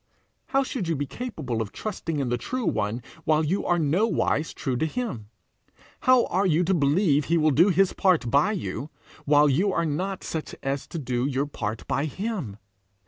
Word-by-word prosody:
How 270 0 +2
should 250 -8 -4
you 165 - 0
be 145 0 -2
capable 140 - -4
of 105 - -4
trusting 175 -7 -4
in 135 -3 -1
the 120 - 0
true 255 - -3
one 110 +4 -1 0.2
while 155 0 +2
you 175 +6 -1
are 175 - +3
nowise 165 0 +1
true 130 -4 -3
to 160 - 0
him? 145 - -4 0.8
How 255 -2 +6
are 190 +3 +1
you 170 0 +3
to 185 +3 +1
believe 150 -1 +3
he 170 - +2
will 155 -1 +3
do 170 +8 +5
his 195 0 +3
part 180 - +2
by 150 +10 +3
you, 155 -6 -4 0.4
while 145 0 +5
you 175 +9 +2
are 170 -2 0
not 185 +6 -2
such 160 -2 -5
as 135 +1 -2
to - - -6
do 125 -3 -1
your 140 0 0
part 110 -6 -5
by 140 - 0
him? 175 - -4
155 Hz, 195 wpm, -25 LUFS, 140-190 Hz, 0.8 s, How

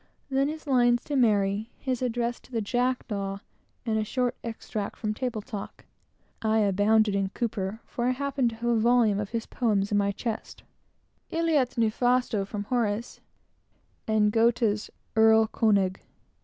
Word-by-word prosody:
Then 270 +1 +2
his 310 +1 -6
lines 245 -3 +3
to 290 - -3
Mary, 210 -3 +2
his 260 -2 -3
address 240 -1 -1
to - - -21
the 230 - -1
jackdaw, 215 -4 -1 0.5
and 220 -2 +1
a - - +1
short 250 +3 -1
extract 220 -2 -5
from 215 -2 -2
Table 230 -2 -3
Talk; 210 -5 -8 0.6
(I 220 0 +2
abounded 210 +1 +3
in 195 -1 0
Cowper, 215 -2 -3
for 240 - -3
I - - +3
happened 270 -1 0
to 225 - -8
have 230 +1 -7
a 230 - +3
volume 230 -3 +3
of 205 -1 -3
his 230 -1 -3
poems 210 -5 0
in 205 - +3
my 200 0 +1
chest;) 225 +2 -5 0.7
"Ille 330 0 0
et 255 -3 +1
nefasto" 235 -1 +1
from 205 0 -4
Horace, 230 0 -2 0.9
and 215 -1 +3
Goethe's 225 -2 +2 0.3
Erl 220 0 +6
King. 200 -4 +2
225 Hz, 155 wpm, -27 LUFS, 210-245 Hz, 0.9 s, Erl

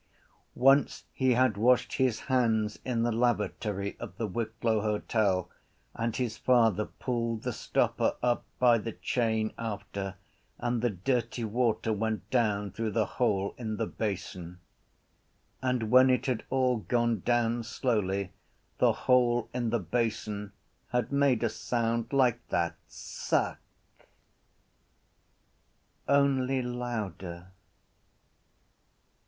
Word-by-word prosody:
Once 135 +3 +4
he 130 -1 +2
had 120 -4 +3
washed 125 +4 +3
his 130 -4 +1
hands 110 -5 +1
in 120 -3 0
the 120 - +1
lavatory 110 -4 -1
of 90 - -8
the 115 - -1
Wicklow 110 +1 -1
Hotel 105 -3 0 0.5
and 115 0 -2
his 125 -4 -2
father 115 -5 +3
pulled 115 -3 -3
the - - -2
stopper - - 0
up 120 -1 +1
by 120 -2 +5
the 115 +1 -5
chain 110 -3 0
after 100 -3 -4 0.4
and 120 -1 -1
the 120 - +2
dirty 120 +4 -1
water 115 0 0
went 110 +1 -2
down 105 -5 +1
through 110 +3 -2
the 110 0 +1
hole 100 -6 0
in 110 -3 -3
the 115 - 0
basin. 90 -5 -5 1.0
And 125 -4 -1
when 130 +1 +7
it 125 - +2
had 125 -4 -1
all 130 -2 +2
gone 120 0 0
down 120 +2 +1
slowly 100 -5 -1 0.5
the - - +4
hole 120 -2 +3
in 120 -2 -1
the 120 - +1
basin 105 -1 -2 0.4
had 125 -1 -1
made 140 -5 +2
a - - +3
sound 115 0 -1
like 125 -4 +3
that: 85 -1 0
suck. - - -2 2.5
Only 135 -2 +2
louder. 105 -8 -5
115 Hz, 120 wpm, -29 LUFS, 105-125 Hz, 2.5 s, when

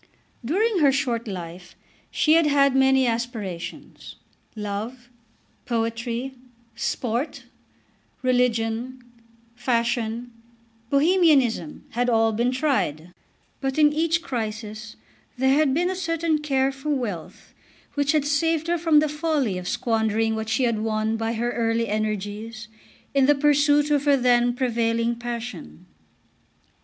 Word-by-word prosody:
During 390 - +1
her 285 -3 +5
short 240 -4 -1
life 180 -2 -8 0.3
she 310 - +2
had 330 -1 +5
had 280 -2 +3
many 265 0 +4
aspirations. 225 -7 -5 0.4
Love, 220 +4 -5 0.6
poetry, 230 +2 -2 0.4
sport, 240 +4 -2 0.8
religion, 245 0 0 0.5
fashion, 235 -1 -1 0.6
Bohemianism 300 -4 +2
had 245 +2 0
all 225 -1 +3
been 235 +3 +1
tried; 215 - -1 0.5
but 270 0 -2
in 295 -1 +5
each 330 +2 +1
crisis 220 -2 -5 0.4
there 265 +1 +3
had 295 -1 +3
been 350 +6 +1
a - - -3
certain 330 -3 0
care 270 -2 +1
for 270 +2 -7
wealth 230 - -4 0.4
which 285 +1 +1
had 300 -2 +2
saved 320 +2 +1
her 340 0 0
from 315 -2 +4
the 310 - +1
folly 295 - -1
of 180 - -7
squandering 225 0 0
what 220 0 -4
she 220 +4 +1
had 230 -3 +1
won 220 0 -1
by 225 0 -2
her 240 +1 -1
early 230 -1 0
energies 215 +1 -4 0.4
in 275 -1 +4
the 290 - +5
pursuit 290 +1 +3
of 290 -1 +2
her 285 -1 +5
then 245 -1 +3
prevailing 235 -2 0
passion. 235 - -7
245 Hz, 125 wpm, -24 LUFS, 225-285 Hz, 0.8 s, her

